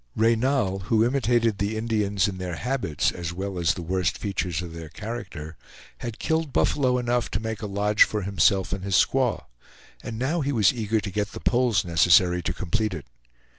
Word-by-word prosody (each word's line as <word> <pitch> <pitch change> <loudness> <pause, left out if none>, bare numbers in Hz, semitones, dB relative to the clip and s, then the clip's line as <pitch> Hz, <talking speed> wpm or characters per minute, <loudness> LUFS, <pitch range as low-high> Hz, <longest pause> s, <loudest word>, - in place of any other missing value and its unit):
Reynal, 115 -3 +2
who 110 +2 +3
imitated 120 -4 +1
the 105 +2 -1
Indians 105 -3 0
in 95 -2 -5
their 90 -2 -4
habits 125 - -1
as 85 -1 -5
well 95 0 -4
as 85 -2 +2
the 90 - -6
worst 90 +2 -1
features 90 -3 -2
of 85 -2 -8
their 85 -1 -8
character, 85 -7 -7 0.4
had 120 -2 -6
killed 160 -2 -1
buffalo 130 -3 +2
enough 120 -1 0
to 95 - -2
make 110 0 -5
a 105 - -3
lodge 105 +1 0
for 105 -2 +4
himself 95 0 +2
and 95 -1 -4
his 100 -1 0
squaw, 130 +2 +2 0.6
and 110 - -6
now 145 +8 0
he 140 0 -1
was 110 -5 +3
eager 110 -2 0
to 100 -1 -5
get 105 +2 -2
the - - -6
poles 120 -7 +2
necessary 90 +2 +4
to - - -2
complete 100 +2 -2
it. 75 - -8
105 Hz, 190 wpm, -25 LUFS, 90-120 Hz, 0.6 s, for